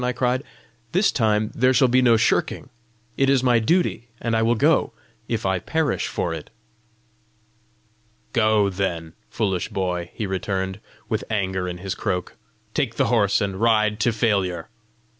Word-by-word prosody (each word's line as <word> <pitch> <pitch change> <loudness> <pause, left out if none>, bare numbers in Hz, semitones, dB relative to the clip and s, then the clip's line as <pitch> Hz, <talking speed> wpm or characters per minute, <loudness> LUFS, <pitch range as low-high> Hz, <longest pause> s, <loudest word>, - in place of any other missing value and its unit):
I 125 0 0
cried. 125 +1 0 0.5
"This 190 +4 +3
time 110 -3 +1
there 130 +2 +3
shall 130 - +5
be 125 +1 +3
no 120 -2 +5
shirking! 115 - 0 0.5
It 135 0 +3
is 135 -2 +3
my 120 -2 +4
duty, 120 - +1
and 115 -1 -1
I 110 - +2
will 115 +1 +3
go 150 +7 +2 0.3
if 115 -4 -2
I 95 -1 +1
perish 155 - -1
for 85 - -2
it!" 80 -2 -7 1.8
"Go, 110 -3 +3
then, 85 -4 -3 0.2
foolish 95 -5 -1
boy!" 90 -2 -2
he 110 - -3
returned, 95 0 -2 0.3
with - - -2
anger 95 -4 -1
in 90 -1 -4
his 95 +1 -4
croak. 90 -2 -3 0.4
"Take - - -1
the - - +1
horse, 100 -3 +3
and 100 -2 -2
ride 110 -2 +3
to 120 - +2
failure! 100 -7 0
110 Hz, 160 wpm, -23 LUFS, 95-120 Hz, 1.8 s, shall